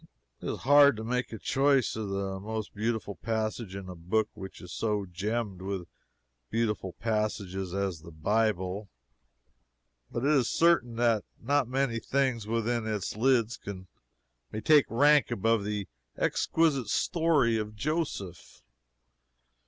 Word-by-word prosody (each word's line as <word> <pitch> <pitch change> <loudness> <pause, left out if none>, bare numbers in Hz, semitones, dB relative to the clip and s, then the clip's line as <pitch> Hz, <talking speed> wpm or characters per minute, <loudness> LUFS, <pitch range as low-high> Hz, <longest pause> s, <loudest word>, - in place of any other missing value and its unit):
It - - -4
is - - -3
hard 145 -2 +6
to 110 - -5
make 125 +2 -1
a 110 - -5
choice 135 +2 +2
of 110 -2 -4
the 95 -1 -3
most 110 +1 -5
beautiful 110 -2 -2
passage 110 0 -2
in 100 -1 -7
a 90 - -6
book 100 +6 0
which 95 -1 -9
is 90 +1 -9
so 105 -3 -1
gemmed 100 +2 -3
with 95 -2 -4 0.6
beautiful 105 -5 -1
passages 105 -4 -2
as 95 -5 -2
the 85 - -11
Bible; 100 +3 0 1.2
but 120 +3 -3
it 145 - +4
is 135 -6 +3
certain 165 -9 +3
that 115 -3 +2 0.2
not 140 +1 +1
many 130 -2 0
things 130 -4 0
within 115 0 0
its 105 -3 -2
lids 115 -1 +2 0.9
may 110 - -3
take 150 +4 +5
rank 145 +5 +5
above 115 -1 +1
the 105 -1 -3 0.3
exquisite 150 -8 +1
story 160 -10 +2
of 105 0 -5
Joseph. 105 - -4
110 Hz, 135 wpm, -29 LUFS, 100-125 Hz, 1.2 s, hard